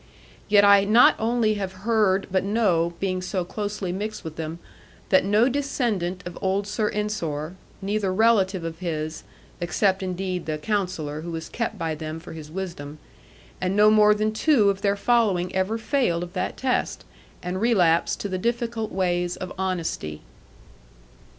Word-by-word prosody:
Yet 205 -1 +6
I 200 -1 +7
not 220 +4 +6
only 225 -1 +2
have 190 -1 -3
heard 210 -4 +2
but 190 -1 +1
know, 190 -5 +1
being 185 -1 -1
so 185 -1 -2
closely 205 -1 -4
mixed 210 +4 -4
with 160 -1 -7
them, 160 0 -5 0.5
that 190 - +5
no 210 +5 +3
descendant 235 -10 -1
of 175 -1 -7
old 195 +1 0
Sir 210 +1 -1
Ensor, 175 -7 -3 0.3
neither 200 -1 0
relative 195 -3 +3
of 165 0 -5
his 155 -3 -4 0.4
(except, 190 +2 +1
indeed, 185 -1 -3
the 155 -1 -1
Counsellor, 170 -5 -2
who 170 - -6
was 165 -1 -5
kept 230 -2 -3
by 165 -3 -2
them 155 +1 -6
for 165 - -10
his 155 -2 -9
wisdom), 160 -5 -6 0.6
and 185 +1 0
no 210 +1 +6
more 210 -1 +6
than 215 +1 0
two 220 -4 +4
of 195 0 -7
their 200 0 +2
following 200 -6 +2
ever 190 +4 0
failed 220 -8 0
of 175 0 -8
that 185 - -3
test, 260 -1 -1 0.4
and 180 +2 -3
relapsed 180 -8 +3
to - - -2
the 185 -1 -3
difficult 235 0 -2
ways 175 -1 0
of 185 0 -7
honesty. 175 - -3
190 Hz, 165 wpm, -24 LUFS, 175-215 Hz, 0.6 s, I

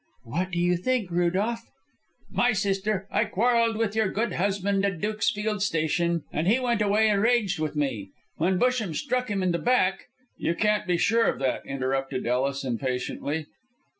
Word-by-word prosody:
"What 170 +11 -2
do 170 - -4
you 175 0 +2
think, 225 -1 -1
Rudolph?" 190 +7 0 0.6
"My 245 -1 +2
sister, 195 0 -1
I - - +2
quarrelled 230 +1 +2
with 220 -2 -1
your 220 -3 +2
good 225 +5 -1
husband 195 +1 0
at 195 -4 -1
the 210 - 0
Dukesfield 210 -1 -1
Station, 170 -2 0
and 155 +3 -1
he 230 +6 +4
went 240 -4 0
away 210 +2 +3
enraged 210 -3 +2
with 155 -1 -2
me. 125 -10 -2 0.3
When 180 +3 +1
Busham 235 -7 +1
struck 250 +8 -1
him 195 -2 -1
in 180 - +2
the 170 - -1
back 240 -7 +1
" - - -36
"You 170 - -1
can't 210 +1 +1
be 175 -1 +2
sure 230 +6 +3
of - - 0
that," 135 -2 -1
interrupted 135 0 -2
Ellis, 135 +3 0
impatiently. 130 +4 -3
195 Hz, 175 wpm, -26 LUFS, 160-220 Hz, 0.6 s, he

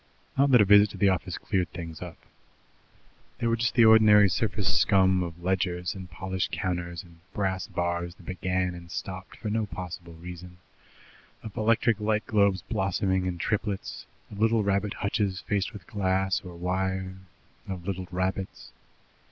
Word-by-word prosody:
Not 140 +1 +4
that 125 -4 +7
a - - +5
visit 105 +1 +7
to - - -9
the 100 - +4
office 95 -5 -1
cleared 90 -2 -1
things 85 -2 -7
up. 90 -2 -8 1.2
There 115 - 0
was 115 - 0
just 115 0 0
the 120 -3 +7
ordinary 110 -2 +7
surface - - +1
scum 95 -1 +4
of 85 -1 -6
ledgers 90 -2 0
and 95 -2 -9
polished 95 +2 -3
counters 85 -1 -3
and 85 -2 -18 0.2
brass 95 -3 -1
bars 85 0 -2
that 90 - -17
began 90 0 -1
and 85 -1 -11
stopped 95 +1 -6
for 110 -3 -4
no 110 -1 0
possible 85 -3 -7
reason, 90 +1 -10 0.9
of 110 -3 -8
electric 110 0 +2
light 105 0 0
globes 100 -3 +2
blossoming 95 0 0
in 90 -1 -2
triplets, 100 +2 -3 0.2
of 100 - -8
little 115 0 +3
rabbit 100 +1 0
hutches 100 -2 -1
faced 100 0 -1
with 105 -6 -11
glass 95 -1 0
or 90 -2 -9
wire, 95 +1 -2 0.5
of 90 -3 -5
little 95 -2 -3
rabbits. 95 +1 -3
95 Hz, 160 wpm, -27 LUFS, 90-105 Hz, 1.2 s, that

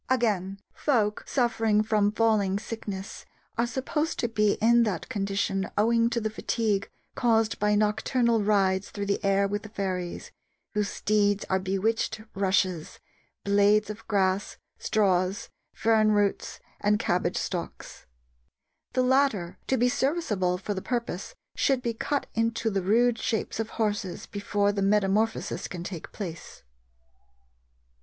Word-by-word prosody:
Again, 200 -6 0
folk 215 -7 0
suffering 225 -4 +2
from 210 -2 +2
falling 215 -3 +2
sickness 205 -2 -6 0.3
are 235 +1 +1
supposed 300 +6 -2
to 235 - 0
be 210 -2 +2
in 235 +2 +4
that 205 -7 -1
condition 195 -1 -1
owing 230 +2 +3
to 235 - -1
the 220 -1 -2
fatigue 215 -2 -1 0.2
caused 225 -2 +1
by 210 0 +2
nocturnal 225 +2 +2
rides 195 -2 +2
through 200 -1 -4
the 200 +1 -1
air 200 0 +3
with 205 +1 -2
the 215 - -10
fairies, 185 -4 -4 0.4
whose 210 -2 0
steeds 205 -1 +1
are 190 - +3
bewitched 195 +4 -1
rushes, 185 -4 0 0.4
blades 205 +1 +3
of 220 +2 -11
grass, 195 -2 0 0.2
straws, 190 -2 +1 0.2
fern 220 -1 +3
roots, 205 -1 0 0.2
and 210 0 +2
cabbage 180 -4 0
stalks. 175 -3 -5 0.9
The 255 0 +2
latter, 250 -9 +1
to 265 - +2
be 245 - +3
serviceable 245 - 0
for 195 +3 -3
the 190 - -4
purpose, 235 - -3 0.2
should 265 -3 +1
be 235 - -1
cut 285 +5 -2
into 225 0 0
the 195 -1 0
rude 230 +5 +3
shapes 220 -1 -2
of 225 0 -2
horses 205 -4 -2
before 205 0 0
the 200 -1 -2
metamorphosis 210 +2 +1
can 175 -1 -6
take 175 -3 -7
place. 170 -6 -8
210 Hz, 135 wpm, -27 LUFS, 195-225 Hz, 0.9 s, in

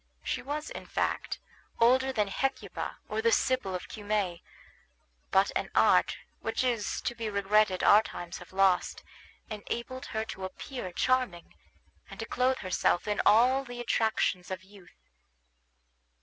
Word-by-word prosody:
She - - -2
was, 295 +3 -4
in - - -8
fact, - - -1 0.4
older 260 +3 +4
than 210 -5 +1
Hecuba 270 +7 -3
or 215 +1 -2
the 230 +1 +3
Sibyl 250 -6 +1
of 180 - -5
Cumae; 205 -5 -2 0.9
but 195 +1 +3
an - - -1
art, - - +4 0.2
which - - -1
it 255 - +3
is 220 -4 -3
to 240 - -2
be 230 -2 -4
regretted 200 -1 +2
our 210 - +8
times 175 -5 -7
have - - -13
lost, 190 -1 +2 0.5
enabled 235 +4 -5
her 220 0 -2
to 190 -4 -7
appear 190 +1 -6
charming, 245 -4 0 0.6
and - - -11
to - - -3
clothe 255 +1 +1
herself 185 -1 0
in 210 - +1
all 250 +5 +5
the 245 -2 -8
attractions 220 -6 0
of 185 -1 -5
youth. 195 -2 -18
215 Hz, 150 wpm, -29 LUFS, 190-250 Hz, 0.9 s, our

